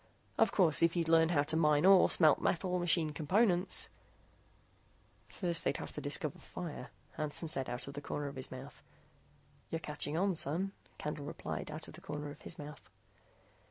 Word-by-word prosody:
Of - - +3
course, 170 -6 +4
if 165 +1 +3
you'd 170 -2 0
learn 165 0 +5
how 150 -4 +3
to 155 +2 -2
mine 150 0 +3
ore, 190 -1 +7
smelt 155 -4 +5
metal, 180 +1 0
machine 165 -2 +2
components 180 +4 +2 0.7
" - - -34
"First 170 -3 +1
they'd - - 0
have - - -7
to - - -5
discover 145 0 -1
fire," 160 -7 -7 0.3
Hansen 155 +2 -2
said 135 -4 0
out 120 +2 -3
of 140 - -7
the 145 - -6
corner 145 0 -4
of 140 - -7
his 130 - -5
mouth. 130 +2 -10 0.9
"You're 165 - -2
catching 150 -1 -3
on, 195 +2 +2
son," 170 +5 -1 0.3
Candle 150 -1 -5
said, - - -4
out 155 +1 -5
of - - -11
the - - -12
corner 150 0 -5
of 145 - -13
his - - -8
mouth. 145 -1 -10
155 Hz, 185 wpm, -34 LUFS, 145-175 Hz, 0.9 s, ore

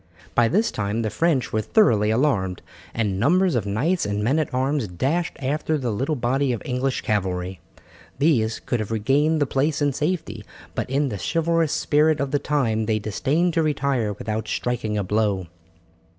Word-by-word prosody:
By 120 - +4
this 215 - +1
time 105 +2 -2
the 110 - -2
French 155 - 0
were 110 - +1
thoroughly 110 - +3
alarmed, 110 -7 0 0.3
and 105 -4 -1
numbers 180 - +3
of 110 -4 -1
knights 150 - 0
and 105 0 -1
men 135 +8 +2
at 155 - -2
arms 130 -1 0
dashed 140 - -1
after 150 +3 -1
the 125 -5 -2
little 135 +9 -1
body 130 +2 0
of 115 - -4
English 130 0 -1
cavalry. 95 -5 -2 0.6
These 125 -7 +2
could 120 - -2
have 110 - -3
regained 140 +8 +2
the 145 - +3
place 140 +3 0
in 145 -2 +1
safety, 150 - -2 0.3
but - - -3
in 140 +1 +1
the 105 -4 -5
chivalrous 165 - +1
spirit 155 +1 +2
of 140 -1 -2
the 145 - +1
time 115 -8 0
they 110 -1 +2
disdained 145 - 0
to 165 - +2
retire 140 -8 0
without 110 +1 -4
striking 110 -2 -2
a 100 - 0
blow. 100 -1 0
125 Hz, 180 wpm, -23 LUFS, 110-150 Hz, 0.6 s, By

